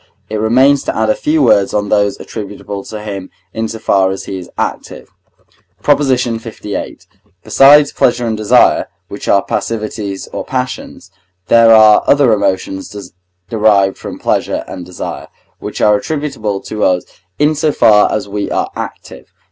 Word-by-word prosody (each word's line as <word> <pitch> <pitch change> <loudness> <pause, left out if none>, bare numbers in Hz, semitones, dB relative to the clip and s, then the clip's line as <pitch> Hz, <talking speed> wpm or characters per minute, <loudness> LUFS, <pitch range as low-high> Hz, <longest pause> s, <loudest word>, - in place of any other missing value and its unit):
It 110 - -2
remains 130 +6 +3
to - - -3
add 110 0 +2
a - - 0
few 155 -1 0
words 100 -6 +3
on 105 -1 -1
those 100 -1 +1
attributable 100 -2 -7
to 105 -1 -8
him 100 -3 -6 0.2
in 110 0 -2
so 110 - -6
far 95 -3 +1
as 95 0 -5
he 95 - -6
is 90 - -11
active. - - -4 0.8
PROP. 145 -1 +4
LVIII. 115 -6 -3 0.4
Besides 145 +1 +5
pleasure 120 0 +1
and 115 -1 -1
desire, 110 -1 +3 0.2
which - - -8
are 100 - +3
passivities 105 -3 -4
or - - -4
passions, 130 -1 -5 0.4
there 115 -1 +6
are 110 -1 +6
other 140 -5 +4
emotions 95 0 -3 0.3
derived 105 -3 +2
from - - -7
pleasure - - -1
and 90 -1 -8
desire, 90 - -7 0.3
which - - -6
are 105 0 +4
attributable 110 -7 -4
to 105 -1 -4
us 90 -1 +2 0.3
in 150 +1 +2
so 155 0 0
far 105 -6 +4
as 105 - -2
we 100 0 -4
are - - -2
active. - - -8
110 Hz, 155 wpm, -14 LUFS, 100-125 Hz, 0.8 s, there